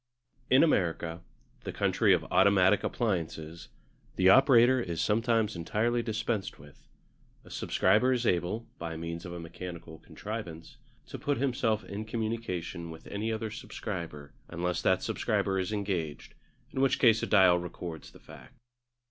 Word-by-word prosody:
In 130 +4 +6
America, 85 - 0 0.4
the - - -4
country - - +2
of - - +3
automatic 100 0 +4
appliances, 85 -7 -3 0.5
the 95 0 +4
operator 130 +1 +6
is 85 -7 -4
sometimes 110 -1 +1
entirely 110 +8 0
dispensed 110 -2 -3
with. 70 0 -17 0.6
A - - -14
subscriber 110 +7 +2
is 125 -2 0
able, 90 +5 0
by 80 -1 -5
means 85 +1 -6
of 85 - -7
a 85 - -6
mechanical 85 -1 -8
contrivance, 90 -7 -8 0.3
to - - -8
put 145 -1 -1
himself 120 -4 0
in 105 +2 -6
communication 110 -7 -4
with 80 0 -11
any 105 +2 -3
other 110 0 -3
subscriber 85 -10 -7
unless 90 +1 -2
that 95 - +2
subscriber 95 -1 0
is 95 +2 -2
engaged, 95 -8 -3 0.4
in 130 - -2
which 135 -1 +3
case 115 -2 +4
a - - -2
dial 95 -4 +5
records 85 -1 -7
the - - -16
fact. 130 - -15
95 Hz, 145 wpm, -29 LUFS, 85-115 Hz, 0.6 s, In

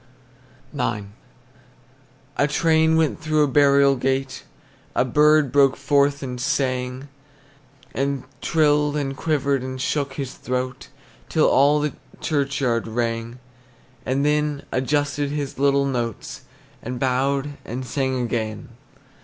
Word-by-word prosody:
IX. 110 -7 -2 1.3
A 145 - +3
train 160 +1 +3
went 160 -1 +1
through 155 -1 +2
a - - +2
burial 140 0 +4
gate, 135 +1 -2 0.5
A - - +3
bird 150 +1 +4
broke 135 -1 +4
forth 140 0 +2
and 125 -2 -5
sang, 130 0 -1 0.9
And 140 -1 -1 0.2
trilled, 150 -2 +2
and 135 -2 -2
quivered, 140 -3 0
and 130 0 -6
shook 140 +1 -1
his 135 -2 -5
throat 125 0 -4 0.4
Till - - +3
all 145 +2 +4
the 150 0 -1 0.3
churchyard 140 -6 0
rang; 115 +1 -3 0.7
And 135 +2 0
then 150 -1 0
adjusted 145 +1 0
his 145 -2 -4
little 140 0 +3
notes, 120 -5 -4 0.4
And 125 +1 -5
bowed 135 +2 0
and 125 +3 -5
sang 130 +1 -1
again. 110 -3 -3
140 Hz, 120 wpm, -22 LUFS, 130-145 Hz, 1.3 s, burial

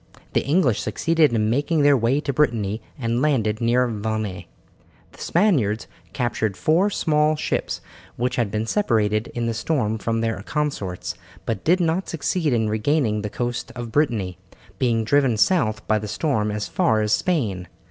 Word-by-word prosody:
The - - +2
English 140 - +2
succeeded 160 +7 +2
in 110 -1 +1
making 145 +4 +1
their 145 0 +6
way 125 +3 +2
to 140 - -2
Brittany 115 -7 0 0.2
and 120 -2 -1
landed 115 -8 +1
near 120 +2 +3
Vannes. 110 -3 -3 0.7
The - - -15
Spaniards 140 - +2 0.3
captured 115 -5 -1
four 175 +6 +3
small 155 -4 +2
ships - - -2 0.3
which 125 +1 -1
had 120 -4 0
been 105 +2 -2
separated 110 - +1
in 120 -1 -1
the 115 - 0
storm 110 -3 -1
from 115 +2 -1
their 115 -3 -1
consorts, 105 - -3 0.3
but 110 -4 -3
did 180 +4 +3
not 170 +2 0
succeed 160 0 -1
in 115 -3 +1
regaining 110 0 +1
the 105 - -3
coast 120 +2 -3
of 120 -2 -6
Brittany, 110 - 0 0.4
being 115 -3 +2
driven 135 -1 +2
south 110 - +2
by 110 -1 +2
the 105 - -6
storm 110 -4 0
as 105 -1 -3
far 110 +3 +2
as 105 0 +1
Spain. 105 - 0
115 Hz, 165 wpm, -23 LUFS, 110-150 Hz, 0.7 s, their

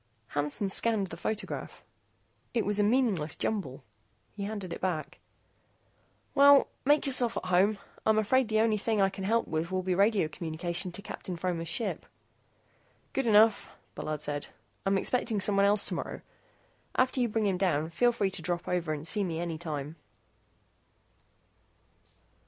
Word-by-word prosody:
Hansen 150 +7 -1
scanned 220 -1 +1
the - - -5
photograph. 215 +5 -5 0.7
It 230 - +1
was 210 0 +1
a - - +4
meaningless 205 - +1
jumble. 150 -11 -3 0.5
He 200 -1 -5
handed 200 -4 -5
it - - -8
back. 155 -5 -3 1.1
"Well, 280 0 +6 0.2
make 295 +2 +4
yourself 250 -4 +3
at - - -4
home. 185 +4 +3 0.3
I'm 220 0 +3
afraid 240 +4 +2
that 220 - -3
the 215 - +5
only 220 -2 +2
thing 220 +1 0
I 195 -1 +4
can 195 - -7
help 230 +3 +1
with 160 +1 -2
will 185 0 -1
be 185 0 0
radio 200 -2 +3
communication 170 +2 -3
to 200 - -7
Captain 180 -2 -6
Fromer's 170 -1 -2
ship." 220 +8 -2 1.1
"Good 270 -3 0
enough," 220 0 +5 0.2
Bullard 155 -1 -4
said. 145 -1 -2 0.4
"I'm 195 0 +3
expecting 230 +1 0
someone 200 0 +3
else 205 0 +4
tomorrow. - - -4 0.7
After 255 0 +2
you 240 - +1
bring 215 0 0
him 190 -3 0
down, 160 -4 0
feel 240 +9 +3
free 200 -4 -1
to - - -2
drop 175 -1 -3
over 170 -3 -1
and 155 +1 -5
see 205 +2 +2
me 165 -3 -3
anytime." 160 -3 -4
195 Hz, 160 wpm, -29 LUFS, 170-220 Hz, 1.1 s, Well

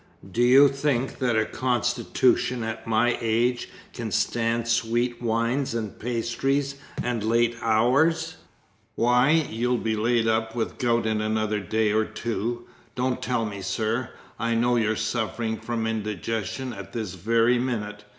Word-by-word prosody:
Do 115 - 0
you 130 +4 +7
think 135 -2 -1
that 120 -3 +1
a 110 - +2
constitution 125 0 +1
at 110 0 -5
my 115 +2 +2
age 120 +2 +1 0.2
can 115 -2 -4
stand 115 +2 0
sweet 120 +1 0
wines 115 +3 0
and 110 -3 -4
pastry, 125 +4 0 0.4
and 120 -2 -1
late 115 +1 +2
hours? 140 +9 +2 0.6
Why, 125 +3 +3 0.2
you'll 120 +3 0
be 110 -1 -1
laid 115 +1 +1
up 110 0 0
with 115 - -3
gout 120 -2 +1
in 110 -1 0
another 110 0 0
day 110 +2 0
or 110 0 +2
two. 120 +1 -3 0.3
Don't 125 0 -1
tell 120 -3 0
me, 100 -2 -6
sir. 110 +5 -1 0.3
I 115 0 0
know 120 +1 +2
you're 110 -2 +1
suffering 110 0 -2
from 115 0 -3
indigestion 110 +3 -3
at 100 -2 -9
this 110 -6 -4
very 115 +6 +2
minute. 105 -4 -3
115 Hz, 145 wpm, -25 LUFS, 110-125 Hz, 0.6 s, you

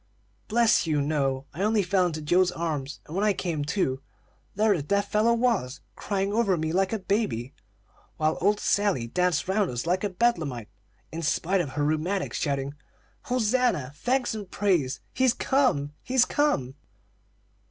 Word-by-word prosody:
"Bless 230 -5 +3
you, 150 -2 +1
no! 140 -2 0
I 170 - -6
only 210 0 +2
fell 185 0 +2
into 155 -2 -5
Joe's 180 +4 +3
arms, 150 -5 -4
and 155 - -9
when 195 - 0
I 210 -1 +3
came 170 -5 -2
to, 140 -6 -1 0.5
there 210 0 +3
the 165 - -2
dear 200 +8 +1
fellow 220 +3 +2
was, 230 - 0
crying 200 0 -2
over 210 -5 +2
me 160 0 -2
like 190 +2 +1
a 225 - 0
baby, 185 - -2 0.6
while 155 0 +1
old 205 +3 +2
Sally 200 - +1
danced 180 +7 0
round 195 0 +1
us 120 +2 -4
like 180 +3 0
a 205 - 0
bedlamite, 165 - -1 0.4
in 165 - -5
spite 175 +4 +1
of 145 -6 -5
her 145 -1 0
rheumatics, 165 +6 -1
shouting: 140 -1 -2 0.5
'Hosanna! 245 - +1
Thanks 245 - 0
and 205 -4 -6
praise! 175 -12 0
He's 255 -2 +2
come, 200 - +1
he's 255 0 +3
come!'" 135 - 0
180 Hz, 165 wpm, -26 LUFS, 150-210 Hz, 0.6 s, Bless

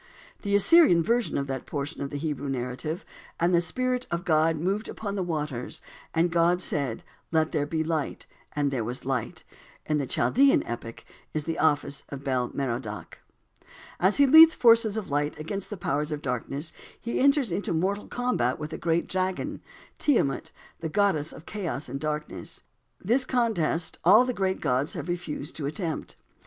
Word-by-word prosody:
The 200 -1 0
Assyrian 205 - +6
version 235 +5 +1
of 140 - -1
that 135 -2 -5
portion 145 +1 -4
of 140 - -3
the 145 - -4
Hebrew 145 -2 -3
narrative: 135 - -4 0.3
"And 175 +2 +2
the 170 - +5
Spirit 255 +8 -2
of 170 +1 -3
God 160 -1 +3
moved 195 +7 -1
upon 205 -2 -5
the 200 - -2
waters, 150 -8 -3 0.3
and 170 +1 +2
God 170 +1 +3
said, 140 -9 -1 0.3
'Let 160 -1 +2
there 145 -2 0
be 160 +1 -1
light,' 160 -2 -2 0.3
and 145 -1 +1
there 125 -4 -1
was 125 +4 -5
light," 130 -4 -3 0.4
in 150 -1 +1
the 140 - -2
Chaldean 265 - +4
epic 115 -1 -7 0.3
is 155 - 0
the 165 +2 -3
office 145 -2 +1
of 140 -1 -7
Bel 130 -3 0
Merodach. 120 -5 -4 0.8
As 190 +3 +3
he 285 - +6
leads 320 +3 +9
the - - -23
forces 230 -3 +5
of 200 -8 -5
light 145 +1 0
against 190 +5 -4
the 205 - -5
powers 150 -2 -1
of 150 0 -4
darkness 140 +5 -3 0.3
he 235 - -3
enters 275 - +3
into 190 +4 -2
mortal 190 +5 -1
combat 245 - 0
with 150 +1 -6
the - - -5
great 165 0 +1
dragon, 185 0 -2 0.4
Tiamat, 230 - +1 0.3
the 160 - -3
goddess 180 -5 +1
of 160 - -12
chaos 175 -8 -4
and 135 +2 -5
darkness. 150 0 -4 0.4
This 240 +7 +1
contest 220 -11 0
all 215 +8 +7
the 250 - -1
great 190 -3 -1
gods 135 0 0
have - - -5
refused 170 -4 -4
to 145 -3 -3
attempt. 160 +2 -4
160 Hz, 175 wpm, -27 LUFS, 140-200 Hz, 0.8 s, leads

